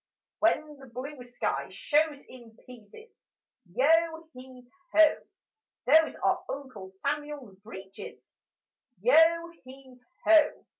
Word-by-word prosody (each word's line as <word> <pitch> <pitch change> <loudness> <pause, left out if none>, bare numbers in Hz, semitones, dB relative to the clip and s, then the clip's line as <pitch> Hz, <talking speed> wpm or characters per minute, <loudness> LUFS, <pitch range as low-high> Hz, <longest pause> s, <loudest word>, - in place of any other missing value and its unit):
When 310 -2 +1
the 270 -1 -14
blue 255 +2 -8
sky 245 0 -3
shows 300 -1 0
in 235 -3 -15
pieces, 250 - -15 0.6
Yo 325 - +2
heave 255 -1 -13 0.3
ho! 315 -1 +6 0.7
Those 315 +4 +4
are - - +1
Uncle 265 -9 -7
Samuel's 280 +2 -5
breeches: 200 -1 -12 0.7
Yo 335 -5 +4
heave 260 -1 -15 0.3
ho! 320 -2 +4
275 Hz, 100 wpm, -28 LUFS, 250-315 Hz, 0.7 s, ho